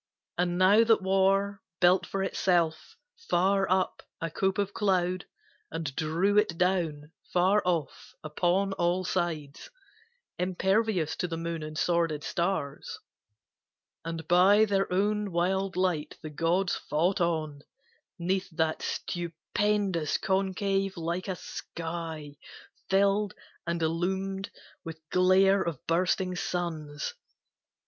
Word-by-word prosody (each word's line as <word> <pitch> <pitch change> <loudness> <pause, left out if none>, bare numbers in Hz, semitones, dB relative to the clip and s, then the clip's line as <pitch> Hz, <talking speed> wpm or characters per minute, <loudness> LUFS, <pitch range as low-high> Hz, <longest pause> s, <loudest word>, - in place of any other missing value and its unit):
And 175 0 0
now 200 +5 +6
that 225 -4 +3
war 195 +1 +2 0.2
Built 180 +1 +4
for 195 0 -2
itself, 175 -4 0 0.3
far 195 +2 +2
up, 185 0 +1 0.2
a 165 -1 -3
cope 190 +3 0
of 200 0 -1
cloud, 185 -3 0 0.4
And 155 -5 -4
drew 170 +6 +2
it 170 -6 0
down, 165 -5 0 0.2
far 190 +4 +3
off, 170 -5 -2
upon 180 +5 +1
all 175 +1 +1
sides, 165 - -3 0.7
Impervious 190 -1 +1
to 180 - -1
the 165 -1 -4
moon 165 0 -3
and 155 0 -6
sworded 165 -4 +1
stars. 170 -6 -2 1.1
And 165 -1 -5
by 195 +5 +6
their 195 -3 0
own 205 +2 +1
wild 190 +2 0
light 180 -5 -1
the 155 - -6
gods 170 +5 +1
fought 175 +6 0
on 155 -4 -1 0.6
'Neath 185 +2 -1
that 160 -1 -1
stupendous 175 0 -1
concave 195 0 0
like 170 +3 -3
a 190 - -2
sky 165 -3 -6 0.5
Filled 200 +1 +2 0.3
and 170 -1 -1
illumed 190 +4 -1 0.3
with 165 -1 -7
glare 190 +2 +4
of 170 -4 -2
bursting 180 +2 +1
suns. 160 -5 -3
180 Hz, 115 wpm, -28 LUFS, 165-195 Hz, 1.1 s, now